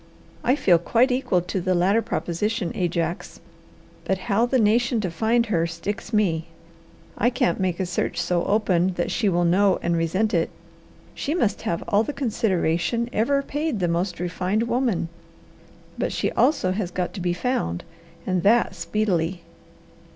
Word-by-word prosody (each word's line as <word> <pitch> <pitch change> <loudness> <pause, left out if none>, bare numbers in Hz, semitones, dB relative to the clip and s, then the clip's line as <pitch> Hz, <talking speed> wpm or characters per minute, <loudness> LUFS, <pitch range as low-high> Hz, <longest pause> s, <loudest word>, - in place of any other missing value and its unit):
I 255 - +3
feel 180 - +4
quite 240 +9 +2
equal 250 -8 +1
to 180 +2 -3
the 185 +1 +1
latter 195 +6 +3
proposition, 210 -2 -2
Ajax, 170 -1 -2 0.6
but 190 - 0
how 215 +4 +1
the 260 - +2
nation 235 +2 +2
to 185 -4 -2
find 230 +6 +2
her 170 -7 +1
sticks 200 +6 -5
me. 180 -7 +1 0.7
I 235 - +4
can't 235 -8 0
make 185 -2 -1
a 190 - 0
search 175 -1 -2
so 175 0 0
open 190 -3 +2
that 175 - -1
she 210 - +1
will 175 -1 +1
know 190 +3 +3
and 170 0 +1
resent 185 +7 0
it. - - +1 0.6
She 300 - -2
must 220 - 0
have 170 - -2
all 205 -1 +3
the 290 +6 -3
consideration 220 - 0
ever 275 +6 +1
paid 295 -4 -2
the 180 - +1
most 175 +1 -1
refined 180 +4 -1
woman, 235 -7 0 0.9
but - - 0
she - - -1
also 185 -11 +2
has 190 -2 -2
got 180 0 -3
to 195 - -6
be 175 0 0
found, 175 - -2 0.4
and 185 -2 0
that 220 +2 +3
speedily. 180 -2 -1
190 Hz, 165 wpm, -24 LUFS, 175-230 Hz, 0.9 s, feel